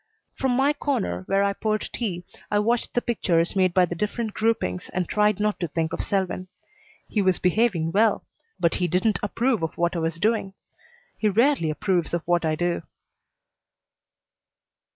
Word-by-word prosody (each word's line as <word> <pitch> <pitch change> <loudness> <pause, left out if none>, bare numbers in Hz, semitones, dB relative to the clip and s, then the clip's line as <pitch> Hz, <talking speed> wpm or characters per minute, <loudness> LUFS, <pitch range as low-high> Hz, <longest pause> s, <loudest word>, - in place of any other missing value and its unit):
From 265 -2 0
my 275 +2 +3
corner 280 -11 -2
where 195 +1 +2
I 200 0 +1
poured 215 +1 -1
tea 185 -7 -3 0.3
I 205 - +1
watched 230 +3 0
the 245 - +1
pictures 175 -8 +1
made 185 -2 +3
by 180 +1 +4
the 175 - -5
different 210 +4 -3
groupings 215 - -1
and 180 -2 0
tried 210 -1 +2
not 210 0 0
to 175 - -1
think 160 +1 -2
of - - -2
Selwyn. 185 -2 -1 0.6
He 210 - 0
was 185 -2 +3
behaving 180 -4 +1
well, 215 +3 +2 0.3
but 170 - +2
he 180 - +2
didn't 185 +6 +1
approve 230 +2 0
of 160 -1 -3
what 170 +1 0
I - - 0
was 165 0 -1
doing. 200 +1 0 0.6
He 215 - +2
rarely 230 - +2
approves 175 +1 0
of 170 - -3
what 175 -1 +2
I 155 -1 +1
do. 175 +1 -1
195 Hz, 175 wpm, -24 LUFS, 170-220 Hz, 0.6 s, by